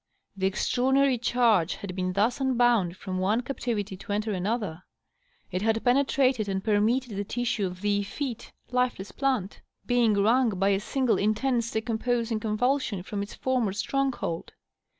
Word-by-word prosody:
The 190 -1 +1
extraordinary 260 +5 +2
chai^ 225 -7 +3
had 185 -3 -7
been 185 -1 -1
thus 225 +7 +1
unbound 240 -8 +2
from 185 -1 -4
one 205 +6 +1
cap 265 +2 -6
tivity 205 -5 -3
to - - -8
enter 210 +2 -1
another; 195 -3 -2 0.7
it 185 0 -2
had 225 +1 +1
penetrated 255 -3 +2
and 190 0 -2
permeated 220 +2 +1
the 200 - -2
tissue 230 -2 -1
of 180 0 -8
the 205 0 +1
effete, 235 +4 -5 0.2
lifeless 250 -6 0
plant, 255 -8 -1 0.2
being 240 -3 +3
wrung 220 +1 +3
by 195 +2 +2
a 195 -1 +2
single 255 +3 0
intense 230 +3 +1
decomposing 230 0 -1
convulsion 220 -2 0
from 200 +1 -4
its 200 - -6
former 250 -7 0
stronghold. 255 -6 -2
220 Hz, 150 wpm, -27 LUFS, 200-250 Hz, 0.7 s, chai^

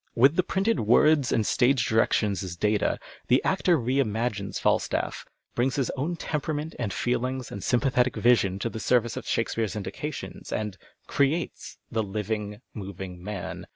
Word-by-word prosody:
With 135 +6 +5
the 185 - +4
printed 195 +5 0
words 135 +5 +4
and 110 - +2
stage 125 +1 +3
directions 105 -3 +2
as 90 -2 -5
data, 105 +4 +1 0.3
the 125 +2 +5
actor 185 -2 +3
re 130 +1 0
imagines 110 -4 -1
Falstaff, - - 0 0.3
brings 125 +2 +1
his 135 -4 0
own 155 +7 -2
temperament 150 0 -3
and 115 -5 -1
fci 120 +5 0
hngs 130 0 -3
and 100 - -6
sympathetic 125 +1 +2
vision 115 -6 +3
to 115 - -2
the 110 - -5
service 120 0 +2
of - - -6
Sliake 115 - 0
speare's 110 -2 -2
indications, 105 +9 -6
and 105 -3 -2 0.2
" - - -43
creates 145 +5 0
" - - -45
the 115 -2 +1
living, 105 +1 -3
moving 95 -3 -7
man. 105 -2 -5
120 Hz, 170 wpm, -27 LUFS, 105-135 Hz, 0.3 s, With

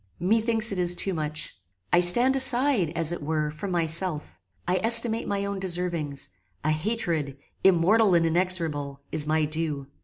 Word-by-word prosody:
Methinks 225 +4 0
it 195 - -4
is 175 0 +2
too 190 +2 -1
much. 155 -1 -4 0.4
I - - +5
stand 240 +10 +5
aside, 260 - +2
as 165 -1 +3
it 175 - -5
were, 150 0 -2
from 155 +6 -7
myself; 170 - -3 0.3
I 185 +1 0
estimate 230 0 +4
my 200 0 -2
own 200 -1 -4
deservings; 170 -6 -2 0.3
a 155 - 0
hatred, 155 - -3 0.3
immortal 190 +3 +3
and 165 -1 +2
inexorable, 165 -5 -1
is 150 -1 -2
my 155 0 +1
due. 155 -2 -3
175 Hz, 155 wpm, -25 LUFS, 155-200 Hz, 0.4 s, I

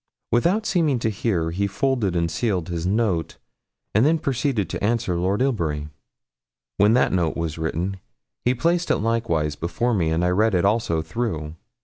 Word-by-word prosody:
Without 175 - +2
seeming 160 - +2
to 115 -1 -1
hear, 90 -6 -1
he 100 +4 0
folded 115 -3 0
and 85 -1 0
sealed 95 -2 -1
his 85 0 -2
note, 100 -5 0 0.6
and 110 - +4
then 160 +4 +4
proceeded 135 - -1
to - - -4
answer 115 -4 +1
Lord 95 +7 +1
Ilbury. 80 - -1 0.9
When 105 +2 +5
that 125 - +3
note 85 -4 0
was 85 -1 -3
written, 85 +4 -2 0.5
he 125 +1 +2
placed 170 +5 +1
it - - +3
likewise 105 -10 0
before 90 +9 -1
me, 85 -7 +1
and 80 +2 +1
I - - +2
read 105 +3 +2
it 90 - +2
also 100 -6 +1
through. 80 -4 -3
100 Hz, 170 wpm, -23 LUFS, 85-120 Hz, 0.9 s, When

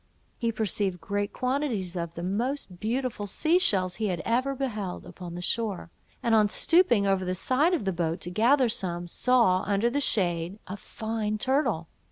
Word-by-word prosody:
He 230 -2 0
perceived 205 -4 -1
great 205 +2 -2
quantities 250 -9 -2
of 170 -1 -4
the 170 - -5
most 205 0 -2
beautiful 230 -1 -2
sea 320 - +2
shells 185 - +1
he 220 -1 -1
had 180 -3 -2
ever 255 +4 +1
beheld, 215 -9 -4
upon 175 -2 -9
the 175 - -5
shore; 205 -5 -2 0.3
and 230 - +2
on 215 -2 +5
stooping 245 - +4
over 195 -1 +1
the 185 0 -2
side 290 - +2
of 290 - -4
the 190 - 0
boat 170 0 -1
to 175 - -4
gather 245 +7 +4
some, 175 -5 -2
saw, 230 -2 +3
under 205 +4 +1
the 285 +3 0
shade, 175 -5 +1
a 190 - -6
fine 215 +1 -3
turtle. 245 - 0
210 Hz, 180 wpm, -27 LUFS, 185-250 Hz, 0.3 s, on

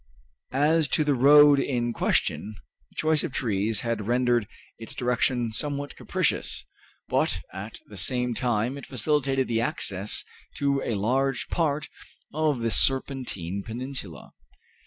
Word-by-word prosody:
As 155 +2 +3
to 155 - +3
the 145 -1 +2
road 145 +2 +7
in 120 -3 -1
question, 110 -1 0 0.3
the - - -27
choice 155 -1 +2
of - - -3
trees 110 -3 -1
had 115 -3 -2
rendered 120 -2 +2 0.3
its 115 +4 -7
direction 125 -2 0
somewhat 145 +4 -3
capricious, - - -1 0.4
but - - +1
at 100 +4 -7
the 105 - -12
same 125 +6 0
time 120 +2 -1
it - - -11
facilitated 135 +1 +1
the 115 -1 0
access 100 -3 0 0.3
to 140 -1 +1
a 115 - -2
large 130 +6 0
part 150 -3 0 0.5
of 150 -4 +1
the 115 0 0
Serpentine 125 -10 0
Peninsula. 115 - -7
125 Hz, 135 wpm, -26 LUFS, 115-140 Hz, 0.5 s, road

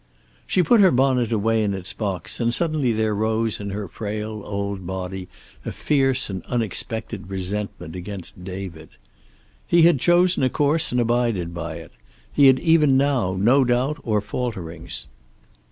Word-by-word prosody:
She 180 - +2
put 215 +7 +5
her 190 - +7
bonnet 125 -4 +2
away 110 0 +1
in 100 -2 0
its 95 -1 -3
box, 100 -5 -4
and 120 -1 +1
suddenly 155 -2 0
there 110 -1 0
rose 110 +1 0
in 100 -1 -5
her 100 0 -4
frail 105 +3 -5
old 100 -2 -4
body 95 0 -5 0.4
a - - -4
fierce 135 -3 +1
and 95 -3 -5
unexpected 110 -3 -3
resentment 95 -2 -4
against 90 -1 -7
David. 90 -4 -7 0.8
He 170 -1 +5
had 170 -5 +5
chosen 175 +3 +3
a 130 - +3
course 150 +4 +1
and 125 - +1
abided 115 -7 0
by 85 -1 -5
it. 85 -1 -10 0.4
He 140 - +6
had 130 -1 +6
even 155 -5 +4
now 130 -9 +1
no 125 +7 +4
doubt 130 +5 0
or 105 -3 0
falterings. 95 -7 -4
110 Hz, 155 wpm, -23 LUFS, 95-130 Hz, 0.8 s, her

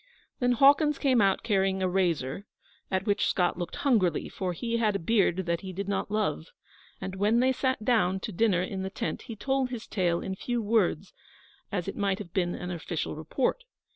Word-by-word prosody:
Then 245 -2 +3
Hawkins 285 +3 +5
came 260 -5 +3
out 195 -1 +2
carrying 195 -3 +1
a - - +2
razor, 180 -2 -1 0.4
at 190 0 -1
which 205 -1 +1
Scott 180 -1 +1
looked 175 -1 -4
hungrily, 220 - +1
for 185 -2 -3
he 230 +7 -2
had 215 -3 +1
a 170 - -4
beard 190 -4 +2
that 170 -1 -1
he 190 - -6
did 195 +2 -5
not 200 0 -1
love. 205 - -1 0.5
And 190 - -5
when 210 +4 +3
they 260 +1 +4
sat 260 -4 -1
down 190 -6 +2
to 215 - -4
dinner 190 -2 +2
in 190 +1 -4
the 190 - -3
tent 225 +4 -4
he 230 - -8
told 265 +3 0
his 245 -3 -6
tale 175 -4 0
in 190 - -4
few 240 +5 -2
words, 205 -5 +1 0.6
as 180 -3 -2
it 195 - -4
might 200 -2 0
have 195 -5 -9
been 175 -2 0
an 180 0 -5
official 170 -2 -4
report. 245 - -1
195 Hz, 200 wpm, -28 LUFS, 180-230 Hz, 0.6 s, Hawkins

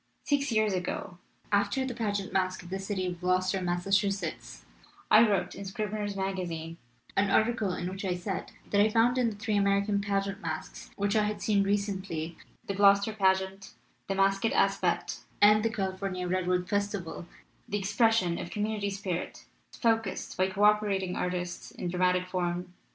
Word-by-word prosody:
"Six 280 -2 +1
years 215 -2 +2
ago, 180 0 -4 0.3
after 205 +6 +2
the 260 - -3
pageant 205 -4 -2
masque 185 -1 0
of 175 - -12
the 190 - -2
city 195 -1 -2
of 175 -1 -4
Gloucester, 185 +1 +1
Massachusetts, 195 +3 -1 0.5
I 215 - +9
wrote, 200 -5 +2
in 200 - -7
Scribner's 205 +1 -3
Magazine, 175 -4 -3 0.4
an 195 0 +2
article 220 -1 +2
in 175 - -3
which 190 +2 -5
I 185 -2 0
said 180 +1 -4 0.2
that 205 - +4
I 215 - +5
found 235 +3 +3
in 240 -2 +3
the 215 - -7
three 210 +1 -2
American 200 0 +2
pageant 200 -1 -1
masques 160 -1 -6
which 200 +1 0
I 215 -1 +3
had 210 -1 -2
seen 200 0 +2
recently, 195 -5 -2 0.3
the 200 - -2
Gloucester 200 +2 +4
Pageant, 190 -1 0 0.3
the 195 - -1
Masque 195 +1 +2
at 225 - +2
Aspet, - - +1 0.2
and 210 +1 +7
the 225 - +2
California 190 -3 -3
Redwood 180 0 0
Festival, 200 -4 -2 0.4
the 205 - 0
expression 205 -3 +2
of - - -5
community 210 0 -2
spirit 190 -3 -4 0.3
focused 225 -4 -1
by 185 +1 +2
co 195 +2 -1
operating 205 -3 +3
artists 180 -1 -3
in 175 - -5
dramatic 180 0 +2
form. 180 -1 -3
195 Hz, 165 wpm, -29 LUFS, 185-205 Hz, 0.5 s, I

